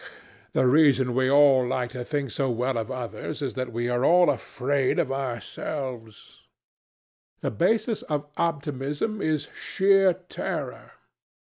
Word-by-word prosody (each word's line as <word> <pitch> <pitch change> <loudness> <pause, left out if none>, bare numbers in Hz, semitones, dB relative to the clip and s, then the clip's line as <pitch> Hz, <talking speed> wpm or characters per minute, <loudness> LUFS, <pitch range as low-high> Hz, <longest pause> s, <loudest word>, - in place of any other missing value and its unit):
"The 130 - +2
reason 135 -2 +4
we 130 +1 +2
all 140 -2 +6
like 125 -1 -2
to 125 -1 -5
think 140 -1 -3
so 135 +2 -1
well 125 +2 -1
of 115 0 -3
others 130 +3 -5
is 130 - -2
that 130 -2 -4
we 120 +1 -2
are 120 +1 0
all 175 0 +5
afraid 135 +1 -1
for 135 - 0
ourselves. 125 -2 -6 1.0
The - - -1
basis 220 - +1
of 150 -2 -3
optimism 150 - -2
is 155 -2 -1
sheer 195 -1 +3
terror. 180 +1 -6
135 Hz, 135 wpm, -25 LUFS, 125-150 Hz, 1.0 s, all